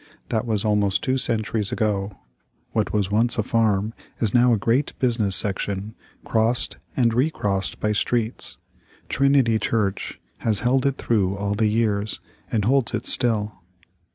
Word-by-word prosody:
That 110 +1 -1
was 110 -1 -1
almost 105 -2 +2
two 130 0 0
centuries 110 -3 -1
ago. 100 -3 -1 0.5
What 110 -2 -1
was 100 -2 -1
once 115 +3 +2
a 110 - +1
farm 110 -1 +1 0.3
is 110 -3 +1
now 120 0 +5
a 115 - +3
great 115 +7 0
business 115 -6 +2
section, 100 +1 0 0.3
crossed 115 +2 +1 0.2
and 120 -3 +3
recrossed 115 -8 -1
by 105 - 0
streets. 115 +2 -1 0.5
Trinity 135 -5 +3
Church 105 -4 -2 0.2
has 110 -3 0
held 130 +2 +2
it 135 - -1
through 100 -4 0
all 100 0 -2
the 110 +1 +1
years, 105 -1 0 0.3
and 105 -3 0
holds 130 0 +2
it - - -4
still. 110 -3 +3
110 Hz, 150 wpm, -23 LUFS, 105-120 Hz, 0.5 s, now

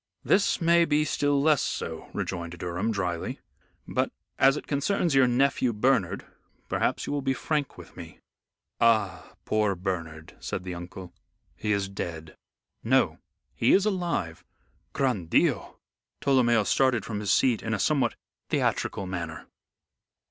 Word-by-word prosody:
"This 195 - +3
may 170 0 +5
be 150 -1 +2
still 145 -2 +1
less 150 0 +4
so," - - -4
rejoined 85 -1 -4
Durham, 90 +6 -2
dryly; 90 -5 -3 0.5
"but - - 0 0.3
as 135 +2 +5
it - - -7
concerns 160 +3 0
your 135 -2 +5
nephew 125 0 +2
Bernard, 110 -4 +1 0.4
perhaps - - 0
you - - -3
will 145 - -1
be 135 0 0
frank 150 +1 -2
with - - -13
me." - - -10 0.6
"Ah, 115 -1 +2
poor 105 -2 +1
Bernard!" 85 -4 -5
said 95 - -4
the 90 -1 -5
uncle. 90 +1 -9 0.4
"He 105 - -2
is 100 -1 +1
dead." 80 -5 -6 0.5
"No. - - +2 0.3
He 115 - +3
is 195 +1 +4
alive." 175 - -2 0.5
"Gran 125 -11 0
Dio!" - - +1 0.4
Tolomeo 120 -5 +3
started 130 -1 +2
from 105 -2 -4
his 105 -2 -1
seat 120 +2 +3
in 110 0 -1
a - - -4
somewhat 150 +2 +1 0.3
theatrical 100 - 0
manner. 85 -3 -5
115 Hz, 140 wpm, -27 LUFS, 90-140 Hz, 0.6 s, may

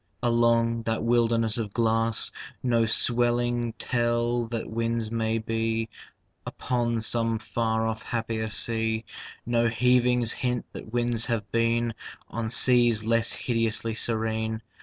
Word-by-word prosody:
Along 115 -1 +2
that 115 0 -2
wilderness 115 -1 +2
of 105 -3 -4
glass, 115 -1 +1 0.3
No 115 -3 +2
swellings 120 0 +1
tell 120 -1 0
that 115 -1 -4
winds 115 0 -2
may 115 -1 0
be 115 0 -1 0.5
Upon 120 -2 -1
some 115 0 +1
far 110 0 -1
off 110 0 -2
happier 110 -2 -3
sea, 110 0 -1 0.4
No 115 0 +2
heavings 125 0 +3
hint 125 -1 -2
that 110 - -9
winds 120 -1 0
have 110 -4 -2
been 115 0 +1 0.4
On 115 -1 -3
seas 120 -2 +3
less 115 +1 +2
hideously 115 -1 -1
serene. 110 0 -2
115 Hz, 120 wpm, -26 LUFS, 110-120 Hz, 0.5 s, heavings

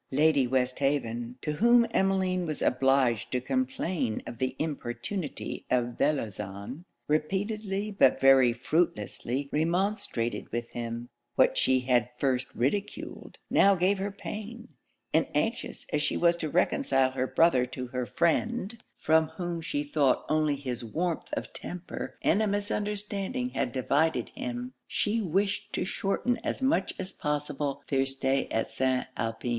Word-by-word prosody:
Lady 145 -1 +3
Westhaven, 125 -2 0
to 150 - -1
whom 235 +8 +5
Emmeline 190 -3 +1
was 155 -2 -3
obliged 130 -3 +2
to 125 - +1
complain 180 - -1
of 115 - -8
the 130 0 -1
importunity 155 +3 -4
of 120 -1 +1
Bellozane, 110 - -2 0.2
repeatedly 195 +6 -1
but 200 - +4
very 135 -2 +6
fruitlessly 125 - -1
remonstrated 165 - -1
with 120 +1 -2
him. 120 0 -5 0.3
What - - +4
she 130 -1 +3
had 125 -1 +3
at 125 +2 -17
first 130 -2 +1
ridiculed, 195 - -2
now 200 0 +6
gave 190 +2 +2
her 200 +1 -1
pain; 215 +4 -7 0.4
and - - +3
anxious - - -1
as 150 - +2
she 145 - +1
was 170 0 +4
to 155 -2 -3
reconcile 135 -2 +2
her 130 0 -1
brother 130 -7 +4
to 130 0 -5
her 125 -1 -3
friend, 225 - 0 0.2
from 160 0 +3
whom 175 -1 -4
she 145 -2 -2
thought 145 -2 +2
only 155 -1 +2
his 130 -4 -4
warmth 165 +9 -2
of - - -4
temper 180 0 -6
and 200 - +3
a 215 - +2
misunderstanding 205 +3 -2
had 125 - -1
divided 135 0 +1
him, 125 +1 -5
she 220 +2 0
wished 195 +2 0
to - - 0
shorten 200 +6 0
as - - -2
much 270 +4 +2
as 190 0 -4
possible 145 -1 -2
their 135 -1 +2
stay 135 0 0
at 115 - -1
St. 130 -1 +1
Alpin. 115 +1 -3
150 Hz, 145 wpm, -29 LUFS, 125-190 Hz, 0.4 s, very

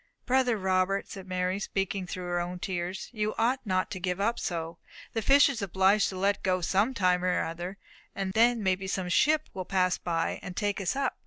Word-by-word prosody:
"Brother 250 -2 +2
Robert," 190 0 +1
said 190 -1 -9
Mary, 185 +1 -1
speaking 195 -1 -2
through 180 +1 -5
her 175 0 -1
own 175 +1 -3
tears, 180 +1 -4
"you 215 -2 -2
ought 245 +4 +2
not 185 -2 0
to 185 - -4
give 180 +1 -2
up 225 +4 0
so. 165 -1 -4 0.3
The 225 - -1
fish 275 +6 +6
is 275 -6 -3
obliged 195 +2 +3
to 190 - -6
let 200 +2 +1
go 185 -1 +1
some 200 +8 +1
time 180 -3 +2
or 180 0 +1
other, 175 +4 -5 0.4
and 195 -1 -3
then 230 0 +3
may 190 -1 +3
be 190 +1 -5
some 185 -1 -2
ship 305 - +3
will 185 - -4
pass 185 -1 +1
by, 165 -1 -1
and 185 -1 -8
take 205 -1 -1
us 190 +4 -1
up. 275 -1 -1
190 Hz, 215 wpm, -28 LUFS, 180-210 Hz, 0.4 s, fish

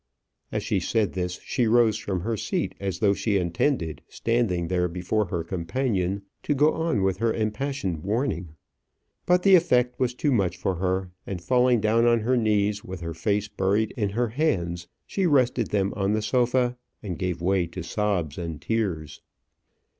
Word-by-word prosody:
As - - -2
she - - 0
said 105 -5 0
this 90 -1 -3
she 120 -3 0
rose 115 -1 +4
from 95 -4 -3
her 115 +5 -1
seat 105 - -2
as 95 -3 -3
though 100 0 +3
she 105 0 0
intended, 85 - 0
standing 115 -8 0
there 90 0 +1
before 90 +5 -1
her 85 -2 -3
companion, 95 +2 -1 0.2
to 145 - 0
go 150 +3 +4
on 160 -11 0
with 95 -1 +1
her 115 +2 +1
impassioned 110 - -2
warning. 100 - -2 0.7
But 180 0 +4
the 195 - +6
effect 125 -9 +4
was 125 -2 0
too 145 +2 0
much 95 -7 +1
for 95 +1 -1
her; 95 0 -1 0.2
and 95 -2 -4
falling 125 +4 +3
down 115 +2 +3
on 115 -1 +4
her 125 +4 +2
knees, 105 -3 +1
with 90 -1 -7
her 85 -1 -4
face 100 +5 0
buried 105 +1 0
in 105 -4 0
her 120 +4 0
hands, 85 - -1 0.2
she 195 -2 0
rested 130 -6 +2
them 100 -1 0
on 100 0 0
the 110 0 0
sofa, 125 +2 +1 0.3
and 90 -6 -5
gave 90 -2 -2
way 90 0 +1
to 85 +1 -7
sobs 90 -4 -1
and 80 -3 -5
tears. 85 -10 -2
105 Hz, 175 wpm, -25 LUFS, 90-120 Hz, 0.7 s, the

